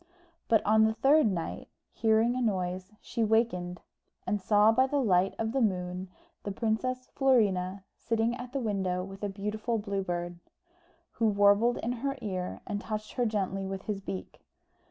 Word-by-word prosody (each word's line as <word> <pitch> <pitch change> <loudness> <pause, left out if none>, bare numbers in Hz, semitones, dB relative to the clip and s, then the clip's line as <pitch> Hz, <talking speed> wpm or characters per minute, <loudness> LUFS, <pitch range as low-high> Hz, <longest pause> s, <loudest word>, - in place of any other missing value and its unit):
But 225 -2 +3
on 220 +1 +5
the 220 0 +1
third 275 +5 +5
night, 175 -5 -3 0.2
hearing 225 +2 +2
a 255 - -1
noise, 185 -3 -1
she 235 - -2
wakened, 210 -6 +1 0.4
and 210 -2 -1
saw 210 +3 +5
by 260 +4 +3
the 285 - -1
light 195 -7 +2
of 225 0 -1
the 270 +2 0
moon 180 -3 -1 0.3
the 200 - -4
Princess 240 +5 -1
Florina 200 -8 +2
sitting 230 +1 0
at 245 0 -8
the 275 - -2
window 190 -6 -1
with 195 +1 -9
a 205 - 0
beautiful 210 +4 -2
Blue 200 -2 -2
Bird, 175 -1 -4 0.7
who 225 - +1
warbled 205 +3 +4
in 235 - -2
her 275 +3 -3
ear 185 -5 -4
and 205 -1 -3
touched 215 -1 -5
her 245 -2 +1
gently 195 -2 -2
with 195 0 -5
his 205 -2 -3
beak. 95 - -7
210 Hz, 170 wpm, -29 LUFS, 190-230 Hz, 0.7 s, on